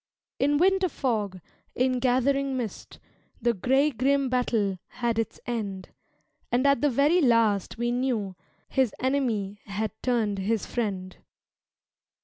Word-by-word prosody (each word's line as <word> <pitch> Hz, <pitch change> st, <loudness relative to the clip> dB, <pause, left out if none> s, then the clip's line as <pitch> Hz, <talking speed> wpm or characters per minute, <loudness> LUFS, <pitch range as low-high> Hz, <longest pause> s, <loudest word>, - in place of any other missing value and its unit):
In 290 Hz, +1 st, +3 dB
winter 380 Hz, +2 st, +3 dB
fog, 210 Hz, -, -2 dB, 0.4 s
in 255 Hz, 0 st, +1 dB
gathering 265 Hz, +2 st, +1 dB
mist 230 Hz, -5 st, -6 dB, 0.4 s
The 235 Hz, 0 st, +2 dB
gray 265 Hz, +8 st, +2 dB
grim 275 Hz, +2 st, +1 dB
battle 225 Hz, -6 st, 0 dB
had 235 Hz, -2 st, -2 dB
its 225 Hz, -, -3 dB
end 205 Hz, -6 st, -4 dB, 0.6 s
And 250 Hz, +3 st, +2 dB
at 280 Hz, -3 st, +4 dB
the 295 Hz, -, +3 dB
very 290 Hz, +7 st, +3 dB
last 230 Hz, -, +2 dB
we 240 Hz, +1 st, 0 dB
knew 240 Hz, -6 st, -1 dB, 0.3 s
His 260 Hz, -5 st, +1 dB
enemy 235 Hz, -7 st, -1 dB
had 205 Hz, +2 st, -3 dB
turned 220 Hz, -5 st, 0 dB
his 215 Hz, +2 st, 0 dB
friend. 195 Hz, -6 st, -3 dB
240 Hz, 130 wpm, -27 LUFS, 210-265 Hz, 0.6 s, at